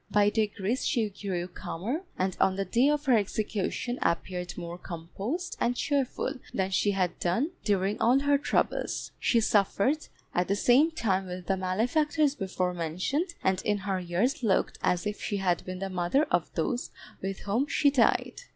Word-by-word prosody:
By 205 0 +4
degrees 215 +2 0
she 225 -5 +1
grew 190 -3 -3
calmer, 195 - -4 0.2
and 185 0 0
on 190 - +4
the 195 0 -1
day 240 +9 +3
of 295 0 0
her 260 -3 +5
execution 215 +3 -1
appeared 180 +1 -1
more 175 0 -6
composed 195 - -5
and 245 +1 +1
cheerful 275 -2 -1 0.2
than 190 0 0
she 205 - +2
had 185 -3 0
done 230 - 0
during 200 0 0
all 245 +3 +5
her 285 0 +3
troubles. - - -1
She 235 - +3
suffered 215 +7 +2 0.3
at 180 0 +1
the 200 - +1
same 255 +9 +5
time 195 - 0
with 180 0 -6
the 195 - +1
malefactors 260 - +1
before 185 -6 -2
mentioned, 185 - -2
and 190 0 +2
in 210 -1 +1
her 195 -1 -2
years 190 - 0
looked 215 -5 +1
as 180 +1 +1
if 210 0 -3
she 205 - -2
had 180 -3 +1
been 185 0 -5
the 195 +1 -3
mother 185 - +2
of - - +1
those 245 -1 -1 0.3
with 195 0 -4
whom 230 +8 0
she 285 -1 +3
died. 265 - +2
200 Hz, 175 wpm, -28 LUFS, 185-250 Hz, 0.3 s, her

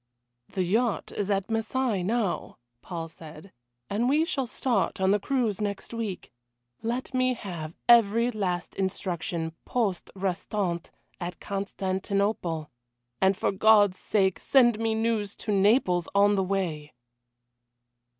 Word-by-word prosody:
"The 190 - -1
yacht 220 +5 0
is 205 -1 -3
at 195 -1 0
Marseilles 225 -2 0
now," 215 -1 -1 0.2
Paul 165 -3 -5
said, 160 +2 -12 0.4
"and 230 +5 0
we 305 +4 +3
shall 275 -7 -2
start 235 -6 0
on 190 0 +3
the 205 - +3
cruise 225 -3 0
next 205 +2 -3
week. 220 -5 -4 0.5
Let 240 +4 -3
me 255 0 +2
have 170 -7 -7
every 235 0 +5
last 185 -5 -2
instruction 175 -3 -2
poste 215 -7 -1
restante, 185 -2 -2 0.3
at 175 -1 -5
Constantinople 195 -4 -2 0.5
and 190 0 +4
for - - +1
God's 205 -1 +5
sake 190 -3 +1
send 240 -5 +4
me 225 -1 0
news 220 -3 0
to 215 - -4
Naples 195 -3 +3
on 205 +1 +5
the 195 -1 +2
way." 175 -7 -2
200 Hz, 130 wpm, -27 LUFS, 185-225 Hz, 0.5 s, every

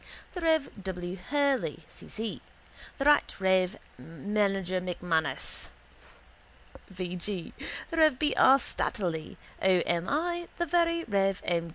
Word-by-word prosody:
the 355 - -5
rev. 320 -3 +2
W. 180 -1 -4
Hurley, 280 +7 0
C. - - -13
C.; 220 0 -4 0.6
the 275 - -2
rt 295 -7 +4
rev. 190 +1 +2 0.2
Mgr 195 +3 -1 0.2
M'Manus, 160 -6 -2 1.2
V. 180 -1 -5
G.; 180 0 -5 0.4
the 330 - -3
rev. 310 -5 +5
B. 295 +2 +1
R. 265 +1 +7
Slattery, 175 - -3 0.2
O. 185 -2 +4
M. 170 0 0
I.; 345 +3 -1
the 345 - 0
very 335 0 +2
rev. 195 - +1
M. 170 -1 0
195 Hz, 130 wpm, -29 LUFS, 180-295 Hz, 1.2 s, R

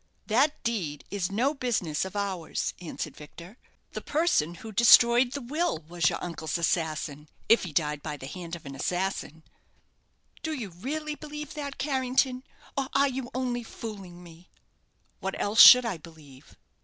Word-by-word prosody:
"That 275 +7 +1
deed 175 -11 -2
is 195 -2 -2
no 250 +8 +1
business 215 - -1
of 190 +1 -8
ours," 195 -5 -2
answered 170 - -6
Victor; 170 +8 -13 0.3
"the - - -6
person 290 - +1
who 220 +5 -9
destroyed 235 +3 +6
the 280 - -5
will 285 - -1
was 175 0 +1
your - - -3
uncle's 165 -3 -3
assassin, 155 -3 -2 0.2
if 230 -3 +4
he 175 - -6
died 150 -1 0
by 150 -1 -5
the 130 - -9
hand 170 +3 -7
of 170 - -12
an 140 - -7
assassin." 175 +1 -3 1.0
"Do 320 - -3
you 240 -9 -5
really 300 - -4
believe 300 -1 -8
that, 285 -2 -6
Carrington; 260 -2 0 0.3
or 275 -1 -1
are 280 0 +4
you 260 -1 -5
only 250 -2 -1
fooling 195 -6 -9
me?" 170 +1 -15 0.7
"What 190 0 -4
else 210 +2 +4
should 250 -1 +11
I 210 -7 -2
believe?" 150 -5 -16
200 Hz, 160 wpm, -27 LUFS, 165-260 Hz, 1.0 s, should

